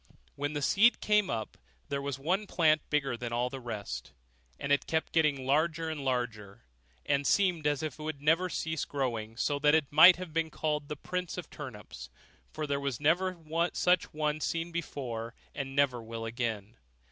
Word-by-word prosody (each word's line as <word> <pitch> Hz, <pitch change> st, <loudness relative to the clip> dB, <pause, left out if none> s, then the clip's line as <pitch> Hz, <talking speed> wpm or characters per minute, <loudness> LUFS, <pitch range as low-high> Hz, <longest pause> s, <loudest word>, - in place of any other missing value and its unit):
When 145 Hz, +1 st, -2 dB
the 145 Hz, -1 st, -2 dB
seed 225 Hz, +9 st, +5 dB
came 210 Hz, -2 st, +2 dB
up, 110 Hz, -2 st, -4 dB, 0.3 s
there 140 Hz, 0 st, -1 dB
was 140 Hz, -1 st, -3 dB
one 185 Hz, +9 st, -1 dB
plant 155 Hz, -4 st, +3 dB
bigger 140 Hz, -4 st, +1 dB
than 120 Hz, 0 st, -5 dB
all 120 Hz, +1 st, 0 dB
the 135 Hz, -, -5 dB
rest; 100 Hz, -, -6 dB, 0.5 s
and 140 Hz, -, -3 dB
it 145 Hz, -, +2 dB
kept 160 Hz, 0 st, -1 dB
getting 150 Hz, -5 st, +2 dB
larger 160 Hz, +3 st, +1 dB
and 150 Hz, -3 st, -5 dB
larger, 120 Hz, -5 st, -3 dB, 0.4 s
and 140 Hz, 0 st, +1 dB
seemed 180 Hz, -6 st, +2 dB
as 145 Hz, +1 st, 0 dB
if 155 Hz, -2 st, -4 dB
it -, -, -7 dB
would 155 Hz, -2 st, -4 dB
never 165 Hz, +5 st, +2 dB
cease 160 Hz, -3 st, -2 dB
growing; 115 Hz, -5 st, -3 dB
so 145 Hz, +2 st, 0 dB
that 150 Hz, +1 st, +5 dB
it 155 Hz, -4 st, +1 dB
might 165 Hz, +5 st, +9 dB
have 180 Hz, -3 st, -8 dB
been 165 Hz, -1 st, 0 dB
called 150 Hz, -2 st, -2 dB
the 150 Hz, -, -4 dB
prince 180 Hz, +4 st, -4 dB
of 180 Hz, -, -7 dB
turnips 105 Hz, -, -9 dB, 0.4 s
for 155 Hz, -, -3 dB
there 140 Hz, -1 st, -1 dB, 0.2 s
never 175 Hz, +5 st, +2 dB
was 165 Hz, 0 st, -2 dB
such 180 Hz, -1 st, +3 dB
a -, -, -19 dB
one 155 Hz, 0 st, -1 dB
seen 165 Hz, +2 st, -2 dB
before, 125 Hz, -8 st, -4 dB, 0.2 s
and 135 Hz, -1 st, -5 dB
never 135 Hz, -4 st, +2 dB
will 115 Hz, 0 st, -6 dB
again. 115 Hz, -2 st, -3 dB
145 Hz, 190 wpm, -30 LUFS, 125-160 Hz, 0.5 s, might